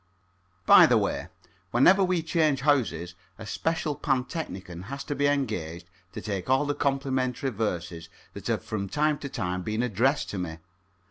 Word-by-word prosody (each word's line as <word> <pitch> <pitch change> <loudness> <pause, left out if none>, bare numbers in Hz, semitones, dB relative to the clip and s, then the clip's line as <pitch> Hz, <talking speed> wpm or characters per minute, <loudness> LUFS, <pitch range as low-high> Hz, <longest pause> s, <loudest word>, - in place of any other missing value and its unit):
By - - +9
the - - +4
way, - - -1 0.4
whenever 185 - +5
we 180 -3 +1
change 155 -4 +1
houses 110 - +1 0.2
a 110 - -9
special 160 +4 -1
pantechnicon 125 - -3
has 140 +4 -6
to - - -3
be 145 0 +1
engaged 90 - -2 0.3
to - - -6
take 100 0 -4
all 135 +3 +3
the 145 - 0
complimentary 135 -2 -1
verses 85 -6 -3 0.2
that - - -8
have - - -1
from 100 -3 -4
time 150 +2 +1
to 140 - -6
time 90 -7 -3
been 110 +5 -2
addressed 125 +5 +1
to 100 - -4
me. 80 -3 -4
130 Hz, 160 wpm, -27 LUFS, 95-145 Hz, 0.4 s, By